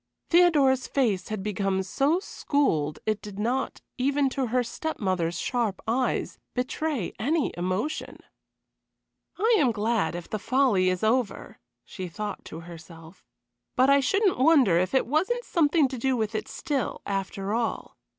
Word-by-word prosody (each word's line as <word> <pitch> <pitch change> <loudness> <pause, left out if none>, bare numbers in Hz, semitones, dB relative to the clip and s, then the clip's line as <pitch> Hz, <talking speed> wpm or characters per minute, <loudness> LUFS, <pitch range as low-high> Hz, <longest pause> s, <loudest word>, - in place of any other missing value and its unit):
Theodora's 295 -7 +4
face 215 -10 0
had 215 -3 -4
become 195 -2 -1
so 280 - +1
schooled 160 - 0
it 215 -1 0
did 205 -2 -9
not, 245 +5 -1 0.2
even 280 +1 +2
to 265 -2 -1
her 250 +2 +1
step 315 +7 -4
mother's 175 -4 -1
sharp 230 -4 -1
eyes, 250 +3 -1 0.2
betray 255 - -2
any 295 +8 0
emotion. 185 - -3 1.2
"I 450 +3 +3
am 260 -5 +3
glad 215 -5 0
if 175 -1 -6
the 215 - -3
folly 230 -7 +2
is 185 +1 -2
over," 230 0 0 0.3
she 185 -2 -6
thought 205 +3 -5
to 165 - -8
herself. 165 0 -13 0.5
"But 260 +2 +4
I 280 - +6
shouldn't 390 - +2
wonder 260 - +5
if 185 +8 -1
it 265 - +3
Wasn't 380 - 0
something 315 -3 +3
to 260 -2 -5
do 260 +1 +1
with 220 -1 -1
it 215 - -3
still, 280 -4 -3
after 195 0 -3
all. 230 0 -2
235 Hz, 150 wpm, -26 LUFS, 195-280 Hz, 1.2 s, I